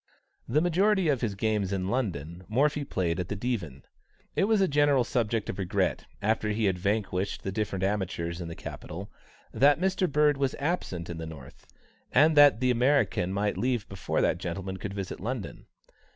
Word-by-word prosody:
The 150 - +2
majority 185 +1 +2
of 135 -5 +1
his 110 -5 -1
games 105 -2 0
in 95 -1 -1
London, 90 - -3
Morphy 145 +6 +1
played 90 -10 -1
at 90 - -2
the 105 - -3
Divan. 95 - -3 0.5
It - - +3
was 220 0 +3
a 190 - +4
general 145 -3 +3
subject 115 -3 -1
of 95 - -5
regret, 95 0 -1 0.2
after 110 0 +1
he 105 +1 0
had 95 -2 +1
vanquished 100 -1 -1
the 95 - -2
different 95 -2 -2
amateurs 90 -4 -2
in 85 - -5
the 85 - -7
capital, 95 +5 -8 0.4
that 145 +2 +4
Mr. 185 -2 +1
Bird 150 0 +3
was 135 -1 0
absent 140 - -2
in 85 -1 -6
the 80 - -5
North, 80 -6 -12 0.4
and 155 +5 +5
that 145 -5 +7
the 125 0 +3
American 125 -7 +2
might 100 -1 -1
leave 120 -2 0
before 95 - -2
that - - +1
gentleman 95 +2 -4
could 100 0 -6
visit 95 -2 -5
London. 115 +2 -5
105 Hz, 180 wpm, -28 LUFS, 95-140 Hz, 0.5 s, that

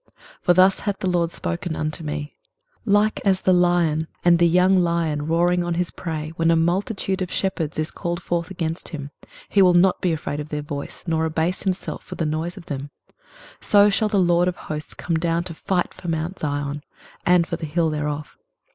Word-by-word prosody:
23:031:004 - - -33 0.2
For 175 - +4
thus 185 +1 +5
hath 205 -1 -2
the 190 - -3
LORD 175 -2 +1
spoken 170 -1 -4
unto 155 +2 -3
me, 150 -1 -5 0.5
Like 210 0 +2
as 190 -2 +2
the 185 - +3
lion 175 -3 +2 0.2
and 170 -1 +6
the 170 - +5
young 180 +3 +4
lion 165 -4 0
roaring 175 +2 +2
on 175 -1 -1
his 175 0 -1
prey, 155 -2 -5
when 165 0 +2
a 165 - +5
multitude 190 +3 0
of 185 - -2
shepherds 170 -6 -2
is 155 +1 -1
called 170 0 -3
forth 170 -2 -2
against 165 -3 -3
him, 145 -4 -6 0.4
he 200 - +3
will 180 -2 +6
not 180 +1 +4
be 180 - +1
afraid 150 -2 -3
of 150 0 -6
their 150 -1 -3
voice, 145 -1 -6
nor 160 -1 +1
abase 160 +3 -1
himself 190 -1 -3
for - - -8
the 165 - -1
noise 160 +4 -2
of 180 - -10
them: 140 -3 -5 0.7
so 205 -1 +5
shall 215 +2 +1
the 210 - +1
LORD 175 -1 +3
of 180 - -1
hosts 150 0 -6
come 170 -2 -1
down 170 +1 0
to 175 - -7
fight 175 +2 -1
for 175 - -10
mount 165 +3 -2
Zion, 145 0 -2 0.4
and 175 -1 +4
for 170 - -4
the 160 - -5
hill 165 +1 +1
thereof. 150 0 -4
170 Hz, 210 wpm, -23 LUFS, 155-180 Hz, 0.7 s, and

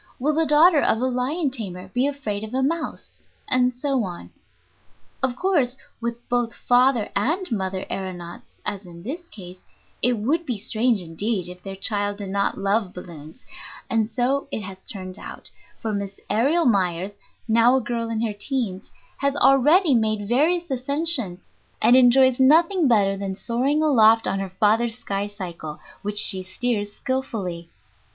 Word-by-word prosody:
Will 295 +4 0
the 320 +1 +1
daughter 305 +1 +6
of 220 - +2
a 255 - 0
lion 260 +4 -1
tamer 190 -7 -5
be 250 +7 +1
afraid 225 -8 -4
of 220 +3 -6
a 265 - +1
mouse? 325 +4 -3 0.3
And 250 0 +3
so 260 0 -1
on. 175 -3 -7 0.9
Of 260 -2 0
course, 280 -8 +1 0.2
with 235 0 -5
both 245 -2 -1
father 245 -2 +2
and 315 - 0
mother 190 -3 -2
aëronauts, 175 -3 -7
as 205 -1 -3
in 170 -2 -12
this 330 - -6
case, 180 -2 -11 0.4
it 245 +2 +4
would 270 +10 0
be 245 -8 -3
strange 220 0 0
indeed 185 +4 -2
if 180 0 -10
their 195 0 -7
child 205 0 -1
did 200 -2 -6
not 200 0 0
love 200 0 0
balloons; 170 - -11 0.5
and 225 -2 +1
so 255 +5 0
it - - -3
has 190 -1 -9
turned 185 -1 -6
out, - - -8 0.3
for 220 -3 -3
Miss 200 -1 -4
Aërial 285 +11 +2
Myers, 190 -4 +1 0.4
now 230 +3 +5
a - - +3
girl 230 0 -3
in 225 -1 -2
her 215 - -2
teens, 205 -3 -3 0.3
has 280 0 0
already 290 +5 +5
made 215 -3 +1
various 320 - +1
ascensions, 265 - 0 0.3
and 245 - +5
enjoys 260 0 +5
nothing 330 +5 +5
better 200 -5 +3
than 195 -1 -4
soaring 260 +9 0
aloft 225 -6 +5
on 195 - -1
her 195 -1 -4
father's 220 +4 +1
skycycle, 195 -8 -5 0.2
which 205 0 -4
she 190 -2 +3
steers 205 +2 -2
skilfully. 200 -11 -4
230 Hz, 160 wpm, -23 LUFS, 195-265 Hz, 0.9 s, daughter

